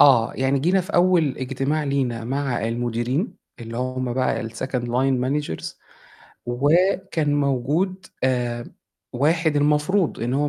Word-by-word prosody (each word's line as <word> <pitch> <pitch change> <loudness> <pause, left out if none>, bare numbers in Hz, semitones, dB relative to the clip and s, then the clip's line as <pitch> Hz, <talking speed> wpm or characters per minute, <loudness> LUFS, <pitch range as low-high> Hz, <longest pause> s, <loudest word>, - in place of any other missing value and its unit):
آه، 120 -4 +6
يعني 135 +1 +1
جينا 180 +7 +2
في 185 +3 -7
أول 175 -5 +3
اجتماع 135 +4 -1
لينا 130 -5 -1
مع 130 -3 -1
المديرين 120 - -1 0.3
اللي 115 0 -7
هم 130 0 -2
بقى 125 -2 0
الsecond 125 +2 -3
line 125 +2 +1
managers 140 - -3 0.7
وكان 160 +4 +2
موجود 145 +8 0 0.2
آآ، 120 -2 -1 0.4
واحد 155 +4 +2
المفروض 150 +6 +2
إن 120 +2 -1
هو 145 +1 +1
135 Hz, 125 wpm, -23 LUFS, 125-155 Hz, 0.7 s, آه